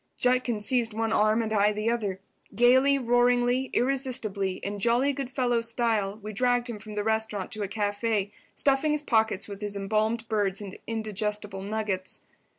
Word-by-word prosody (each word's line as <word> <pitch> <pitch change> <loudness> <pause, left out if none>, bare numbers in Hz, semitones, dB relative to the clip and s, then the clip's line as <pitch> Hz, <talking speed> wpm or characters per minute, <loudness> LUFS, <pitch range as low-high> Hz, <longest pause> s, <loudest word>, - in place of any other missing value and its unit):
Judkins 250 -4 +2
seized 235 -3 +1
one 225 0 0
arm 215 +2 +3
and 220 0 -3
I 210 0 +4
the 215 +2 0
other. 205 -5 -2 0.4
Gaily, 260 +4 +5
roaringly, 245 0 +2
irresistibly, 240 -7 -1
in 200 +2 -5
jolly 240 +6 +2
good 270 -2 -4
fellow 245 -3 +1
style, 230 -4 0
we 215 0 -6
dragged 245 +2 +1
him 230 -3 -6
from 215 0 -9
the 205 - -1
restaurant 220 -3 -1
to 215 - -5
a 200 - -1
café, 205 0 -1 0.2
stuffing 280 +2 +2
his 300 0 -1
pockets 220 -6 +1
with 200 0 -8
his 205 -1 -3
embalmed 215 +3 -1
birds 205 -3 0
and 200 -2 -8
indigestible 210 -2 -2
nuggets. 200 -2 -3
220 Hz, 165 wpm, -27 LUFS, 205-245 Hz, 0.4 s, Gaily